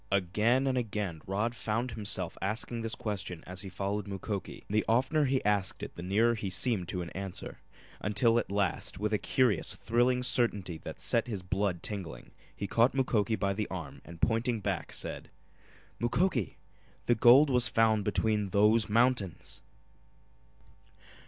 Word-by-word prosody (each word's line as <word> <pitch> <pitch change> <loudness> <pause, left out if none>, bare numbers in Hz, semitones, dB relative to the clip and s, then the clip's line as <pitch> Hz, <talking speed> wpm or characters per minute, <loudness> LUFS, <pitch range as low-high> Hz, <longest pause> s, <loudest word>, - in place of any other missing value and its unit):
Again 105 +7 +2
and 130 -1 +1
again 105 -8 -3
Rod 105 +5 -1
found 115 +2 -2
himself 105 -2 0
asking 110 +4 -2
this 115 0 -2
question 95 -5 -4
as 90 0 -8
he 95 - -7
followed 100 +3 -3
Mukoki, 100 0 -5
and - - -7
the 110 - +3
oftener 130 +6 +2
he 130 -3 0
asked 100 -2 0
it - - -6
the - - -7
nearer 105 +6 +2
he 105 -4 -3
seemed 95 0 +1
to 90 0 -3
an 85 - -8
answer, 95 -1 -6 0.4
until 115 +3 +2
at - - -5
last, 100 -4 -1
with 105 +1 -1
a 105 - +2
curious, 120 -5 +1
thrilling 120 +4 +1
certainty 100 -9 0
that - - -8
set 115 0 0
his 105 -6 -4
blood 95 -2 -1
tingling 95 -6 -5 0.2
he 100 - -4
caught 115 +6 +2
Mukoki 115 -4 +1
by 100 -2 0
the 105 +1 -2
arm 85 -6 -7
and 85 -1 -12
pointing 115 +2 +1
back, 100 - -3
said: - - -5 0.7
"Mukoki 120 - 0 0.5
the 120 - +4
gold 125 +6 +6
was 125 -1 +4
found 110 -2 +3
between 105 -1 0
those 105 +3 +3
mountains!" 105 -8 0
105 Hz, 160 wpm, -30 LUFS, 95-120 Hz, 0.7 s, gold